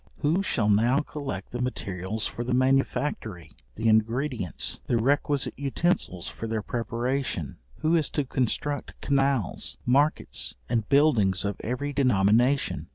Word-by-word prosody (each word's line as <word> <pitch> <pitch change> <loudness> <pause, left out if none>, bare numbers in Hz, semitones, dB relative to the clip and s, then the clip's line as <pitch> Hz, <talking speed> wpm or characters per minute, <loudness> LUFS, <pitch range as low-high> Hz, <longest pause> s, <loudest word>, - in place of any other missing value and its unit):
Who 160 +6 +2
shall 115 - 0
now 115 +7 +3
collect 140 -10 -6
the 120 - -4
materials 100 -4 -3
for 120 - -3
the 125 +1 0
manufactory, 130 - 0 0.2
the 110 +1 -1
ingredients, 115 - 0
the 120 - +2
requisite 140 +3 +1
utensils 140 - -1
for 115 - -6
their 110 -1 -2
preparation? 120 - -2 0.2
Who 160 +2 +3
is 160 -3 +2
to 145 - +2
construct 130 +3 -2
canals, 135 -7 0
markets, 135 - +1
and 115 -3 -1
buildings 110 - +3
of 100 -1 -3
every 140 +5 -2
denomination? 125 +1 +2
125 Hz, 130 wpm, -26 LUFS, 110-140 Hz, 0.2 s, now